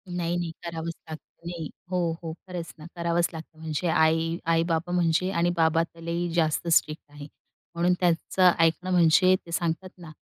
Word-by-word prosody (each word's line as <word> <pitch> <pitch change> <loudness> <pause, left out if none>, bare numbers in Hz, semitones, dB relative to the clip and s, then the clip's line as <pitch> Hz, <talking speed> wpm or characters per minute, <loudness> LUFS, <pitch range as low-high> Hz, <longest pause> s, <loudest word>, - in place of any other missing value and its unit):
नाही, 175 -1 -1
नाही, 175 -2 -3
करावंच 165 -1 -4 0.2
लागतं. 160 +2 -11
नाही. 170 -3 -5 0.2
हो, 175 -2 +1
हो. 160 -1 -4
खरंच 175 -3 -6
ना, 155 - -10
करावंच 170 0 +1
लागतं. 160 0 -10
म्हणजे 160 +2 -3
आई 160 +1 +2 0.2
आई-बाबा 165 +1 0
म्हणजे 175 +1 +2
आणि 175 -2 +1
बाबा 165 0 +3
तर 165 0 -13
लई 170 +1 -2
जास्त 165 0 +1
स्ट्रिक्ट 155 -2 +1
आहे. 145 0 -10 0.5
म्हणून 175 +2 +2
त्याचं 180 +1 +3
ऐकणं 165 +3 +2
म्हणजे 180 +1 +5
ते 170 - -11
सांगतात 170 +2 -2
ना, 170 -3 -11
170 Hz, 170 wpm, -26 LUFS, 160-175 Hz, 0.5 s, म्हणजे